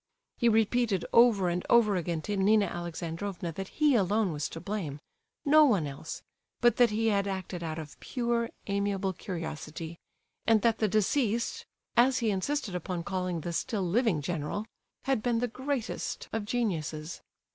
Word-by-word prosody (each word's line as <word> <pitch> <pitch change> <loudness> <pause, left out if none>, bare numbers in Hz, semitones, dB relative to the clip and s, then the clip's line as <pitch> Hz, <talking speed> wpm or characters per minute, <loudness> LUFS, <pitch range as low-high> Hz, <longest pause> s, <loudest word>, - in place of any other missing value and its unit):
He 235 - +4
repeated 220 -3 +2
over 230 -6 +6
and 175 +1 -1
over 225 -4 +5
again 170 -2 -2
to 205 - -2
Nina 205 +2 +4
Alexandrovna 175 +1 -4
that 190 +4 -5
he 300 +4 +2
alone 210 -2 +2
was 145 -2 -3
to 165 - -7
blame—no 200 - 0
one 210 - +3
else—but 160 +10 -3
that 245 -1 +6
he 225 +2 +1
had 200 -1 +1
acted 190 -2 -4
out 160 -1 -4
of 155 -3 -8
"pure 235 -2 -1 0.2
amiable 200 -1 0
curiosity," 165 -2 -6 0.5
and 220 -2 +4
that 230 -1 +3
"the 215 - +3
deceased," 220 +3 0 0.3
as 255 +2 +5
he 225 -3 +1
insisted 205 +2 -1
upon 180 0 -3
calling 180 -2 -2
the 170 +2 -4
still 200 +3 -1
living 195 - +2
general, 170 +5 -3 0.4
had 270 -5 +1
been 240 0 +1
the 245 +2 +1
greatest 260 0 -3
of 220 -2 -2
geniuses. 170 -9 -2
200 Hz, 155 wpm, -29 LUFS, 170-230 Hz, 0.5 s, over